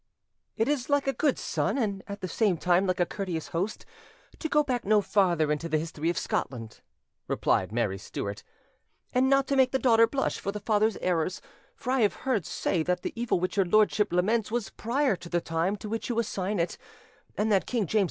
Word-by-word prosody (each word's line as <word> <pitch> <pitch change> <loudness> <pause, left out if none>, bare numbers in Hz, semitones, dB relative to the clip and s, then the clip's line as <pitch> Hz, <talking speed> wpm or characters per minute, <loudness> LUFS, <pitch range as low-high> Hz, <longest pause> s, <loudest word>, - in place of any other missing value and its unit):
"It 225 - +1
is 285 -3 -1
like 285 -1 +2
a 270 - +1
good 290 -2 +1
son, - - -1
and 200 -6 -1
at 200 0 -7
the 185 - -3
same 195 0 +1
time 180 +3 +2
like 185 0 0
a 175 - +4
courteous 180 -5 -4
host, 190 +6 -3 0.5
to 315 - -3
go 300 0 +4
back 250 -4 -2
no 210 +1 +4
farther 175 -6 +2
into 150 +3 -2
the 155 - +2
history 160 0 -2
of 175 - -1
Scotland," 115 -4 -3 0.5
replied 95 +1 +1
Mary 110 -4 -1
Stuart, 100 +1 -5 0.7
"and 255 +1 +3
not 275 0 +4
to 275 - 0
make 260 -1 +5
the 265 - +2
daughter 230 -3 +5
blush 270 +3 -1
for 200 - -3
the 210 - -5
father's 215 +1 +1
errors; 180 0 0 0.4
for 265 - -4
I 265 - +2
have 210 -3 +3
heard 235 - 0
say 170 - -1
that 180 +2 -1
the - - -3
evil 235 -5 0
which 185 +2 -2
your 195 - +4
lordship 210 +1 +3
laments 205 +5 +1
was 230 -2 -2
prior 255 0 0
to 170 - -11
the 175 - +1
time 165 +4 -1
to 210 - -8
which 225 +3 -3
you 235 - -1
assign 205 -3 -1
it, 170 - -1 0.6
and 215 +1 +1
that 195 -2 +2
King 235 -5 0
James - - -10
V. 215 - +3
205 Hz, 220 wpm, -28 LUFS, 175-235 Hz, 0.7 s, make